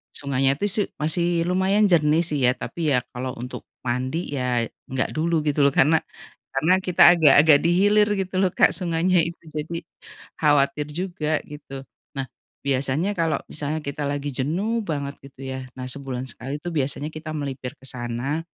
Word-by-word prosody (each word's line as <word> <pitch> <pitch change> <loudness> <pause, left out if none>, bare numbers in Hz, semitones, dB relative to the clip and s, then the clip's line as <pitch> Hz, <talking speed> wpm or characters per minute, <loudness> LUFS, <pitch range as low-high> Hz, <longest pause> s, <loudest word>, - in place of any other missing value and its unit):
sungainya, 135 -1 +1
tuh, 205 - +1
su 210 +1 +3 0.2
masih 170 +2 +1
lumayan 190 +3 +2
jernih 160 0 +4
sih 150 -4 0
ya, 125 - +5
tapi 155 -4 -1
ya 125 - +1
kalau 130 +1 -4
untuk 125 +2 -8 0.2
mandi, 130 +7 -2
ya, 125 -3 0 0.2
enggak 130 0 -2
dulu 160 0 +1
gitu, 145 0 +1
lho, - - +2
karena 155 +3 +5 0.6
karena 155 +7 +3
kita 180 -2 +2
agak-agak 155 -2 +6
di 170 - +2
hilir 210 +1 +4
gitu, 190 -1 -3
loh, 185 - +3
Kak, - - +4
sungainya 175 +1 +1
itu, 170 +1 -6
jadi 160 +3 -3 0.6
khawatir 145 -1 +3
juga 155 -2 -2
gitu. 135 -2 -9 0.3
Nah, 135 -1 -2 0.4
biasanya 140 +8 0
kalau 165 -2 +1
misalnya 150 +1 -3
kita 140 +1 -4
lagi 145 0 -3
jenuh 190 - -1
banget 140 -4 -3
gitu, 135 -1 -14
ya. 130 -1 -6
Nah, 130 - -4
sebulan 135 -2 -4
sekali 130 +6 -6
tuh 175 - -4
biasanya 145 0 -1
kita 155 0 -6
melipir 135 -3 -4
ke 130 - -18
sana, 125 +6 -3
150 Hz, 170 wpm, -23 LUFS, 135-170 Hz, 0.6 s, agak-agak